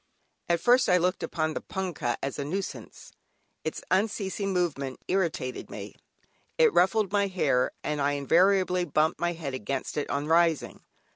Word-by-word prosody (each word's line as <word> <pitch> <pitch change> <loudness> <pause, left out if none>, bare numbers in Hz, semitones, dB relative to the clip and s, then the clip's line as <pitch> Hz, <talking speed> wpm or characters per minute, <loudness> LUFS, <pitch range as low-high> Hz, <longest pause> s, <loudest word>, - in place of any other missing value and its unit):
At 170 0 +3
first 245 +5 +4
I 180 - +6
looked 180 +1 0
upon 155 -2 -1
the - - -4
"Punkah" 180 -11 -3
as 140 +1 -3
a - - -1
nuisance, 190 +7 -6 0.5
its - - -4
unceasing 195 0 0
movement 145 -8 -1
irritated 170 -9 -1
me, - - -8 0.6
it 475 -3 +5
ruffled 195 +2 +3
my 200 -1 +2
hair, 145 -9 +1
and 150 -1 -2
I 140 +1 +2
invariably 180 +5 +3
bumped 155 0 +1
my 175 0 0
head 155 -5 -5
against 130 +4 -4
it 150 - -2
on 140 +1 -1
rising. 165 -1 +2
170 Hz, 155 wpm, -27 LUFS, 145-190 Hz, 0.6 s, I